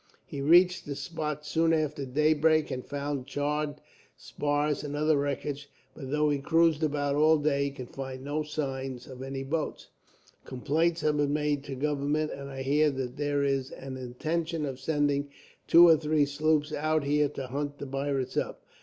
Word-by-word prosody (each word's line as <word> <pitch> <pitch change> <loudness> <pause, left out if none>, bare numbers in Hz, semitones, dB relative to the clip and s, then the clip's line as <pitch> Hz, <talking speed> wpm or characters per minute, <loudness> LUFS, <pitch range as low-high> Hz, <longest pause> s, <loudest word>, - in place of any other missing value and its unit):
He 140 - -6
reached 175 +5 +5
the 140 - -3
spot 150 0 -4
soon 165 +2 +2
after 150 -3 -1
daybreak, 155 +3 +3
and 130 -1 -3
found 140 -2 -4
charred 145 +1 -1 0.4
spars 145 0 -1
and 145 0 -4
other 155 +1 +2
wreckage; 140 0 -3 0.2
but 135 -2 -8
though 150 +1 +2
he 145 - 0
cruised 165 +1 +3
about 145 -2 0
all 155 +2 +5
day, 145 -1 +1
he - - -1
could 130 -3 -9
find 130 -1 -6
no 145 +2 -2
signs 135 -4 -4
of 130 -1 -10
any 135 0 -4
boats. 150 +3 -3 0.5
Complaints 160 +6 0
have 150 -1 +1
been 145 -1 +1
made 150 -2 0
to 140 -2 -5
government, 150 +2 -1
and 140 0 -7
I 135 -1 -5
hear 150 +3 +3
that 130 -1 -4
there 145 -1 0
is 135 -2 0
an 135 0 -8
intention 155 +6 -3
of 135 -2 -5
sending 145 -2 0 0.4
two 175 +1 +8
or 165 -1 +7
three 150 -1 +2
sloops 150 +1 +1
out 155 0 +1
here 145 +1 +2
to 135 -2 -6
hunt 145 +3 -4
the 140 - -6
pirates 135 -1 -2
up. - - -2
145 Hz, 180 wpm, -28 LUFS, 140-155 Hz, 0.5 s, two